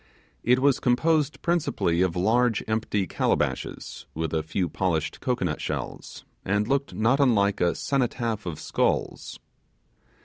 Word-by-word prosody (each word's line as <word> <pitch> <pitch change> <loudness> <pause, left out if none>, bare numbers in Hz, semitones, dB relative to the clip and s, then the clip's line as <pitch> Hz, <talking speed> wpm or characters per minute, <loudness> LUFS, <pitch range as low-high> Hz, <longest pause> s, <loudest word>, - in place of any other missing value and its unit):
It 125 +1 +4
was 135 0 +3
composed 150 +4 +1
principally 150 - +1
of 90 -2 +1
large 115 +5 +2
empty 110 -2 0
calabashes, - - -2
with 80 -1 -2
a 80 - +1
few 85 +4 -2
polished 80 -4 -1
cocoanut 95 -11 -1
shells, - - -5 0.2
and 105 +2 0
looked 140 +2 -1
not 115 +6 +2
unlike 100 -7 +3
a 85 -1 +2
cenotaph 120 -6 -1
of 80 -3 -4
skulls. - - -1
110 Hz, 130 wpm, -26 LUFS, 90-130 Hz, 0.2 s, It